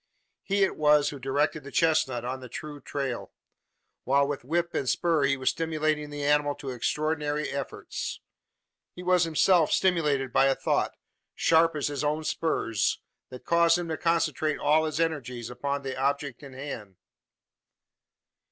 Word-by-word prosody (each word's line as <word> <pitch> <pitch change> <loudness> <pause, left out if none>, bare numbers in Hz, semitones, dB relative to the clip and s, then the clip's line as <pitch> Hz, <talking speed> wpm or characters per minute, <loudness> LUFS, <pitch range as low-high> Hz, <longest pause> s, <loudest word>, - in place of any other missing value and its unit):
He 200 0 +1
it 195 - 0
was 150 -1 +4
who 145 - -8
directed 145 +3 0
the 140 - -9
chestnut 135 -6 +1
on 130 +1 -3
the 130 -1 -10
true 145 +1 -7
trail; 135 -2 -4 0.7
while 140 +1 +3
with 145 -3 -4
whip 170 +5 -1
and 130 - -1
spur 165 -5 +2
he 135 0 +2
was 130 - +1
stimulating 155 -2 -1
the 145 0 -5
animal 145 0 +2
to 135 -2 -6
extraordinary 150 +4 -1
efforts. 140 -1 -5 0.8
He 180 - -8
was 180 -1 +3
himself 165 +1 +3
stimulated 150 -8 +1
by 135 - +5
a 135 - +3
thought - - -1 0.4
sharp 165 0 +3
as 145 - -1
his 145 0 -3
own 150 +2 0
spurs 115 - 0 0.3
that 125 - -11
caused 170 0 +4
him 175 -1 -4
to 160 - -1
concentrate 165 -2 +1
all 155 +2 +3
his 155 0 -3
energies 125 -8 -2
upon 140 +3 -3
the 135 -1 -4
abject 140 0 -1
in 140 -2 -11
hand. 130 -8 -7
145 Hz, 160 wpm, -27 LUFS, 135-160 Hz, 0.8 s, by